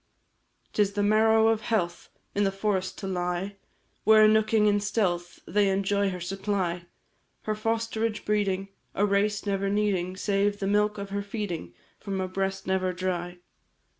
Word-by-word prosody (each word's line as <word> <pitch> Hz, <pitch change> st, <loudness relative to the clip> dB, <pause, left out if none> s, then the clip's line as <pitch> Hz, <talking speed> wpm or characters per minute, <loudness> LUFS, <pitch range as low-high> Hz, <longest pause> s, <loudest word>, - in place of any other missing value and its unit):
'Tis 205 Hz, -1 st, +2 dB
the 205 Hz, 0 st, 0 dB
marrow 220 Hz, +1 st, +4 dB
of 225 Hz, -1 st, +1 dB
health 180 Hz, -7 st, -2 dB, 0.2 s
In 205 Hz, -, +1 dB
the 195 Hz, -, +2 dB
forest 195 Hz, -1 st, -1 dB
to 195 Hz, -, -5 dB
lie, 180 Hz, +2 st, -2 dB, 0.5 s
Where, 215 Hz, 0 st, +7 dB
nooking 215 Hz, 0 st, +3 dB
in 205 Hz, -1 st, +3 dB
stealth, 190 Hz, -4 st, -1 dB
They 205 Hz, -1 st, +2 dB
enjoy 200 Hz, +1 st, +1 dB
her 180 Hz, -1 st, -5 dB
supply, 180 Hz, -1 st, -2 dB, 0.6 s
Her 215 Hz, -, -1 dB
fosterage 225 Hz, 0 st, -2 dB
breeding 200 Hz, -2 st, 0 dB, 0.3 s
A 205 Hz, -, +3 dB
race 205 Hz, +1 st, +1 dB
never 195 Hz, -1 st, 0 dB
needing, 195 Hz, -3 st, 0 dB
Save 200 Hz, +1 st, +1 dB
the 195 Hz, -, -3 dB
milk 210 Hz, +1 st, +2 dB
of 200 Hz, -1 st, -6 dB
her 200 Hz, 0 st, -1 dB
feeding, 200 Hz, -, -5 dB, 0.2 s
From 195 Hz, -2 st, -4 dB
a 185 Hz, -, -1 dB
breast 195 Hz, +1 st, -2 dB
never 185 Hz, -1 st, 0 dB
dry. 175 Hz, -1 st, -3 dB
200 Hz, 155 wpm, -27 LUFS, 185-210 Hz, 0.6 s, Where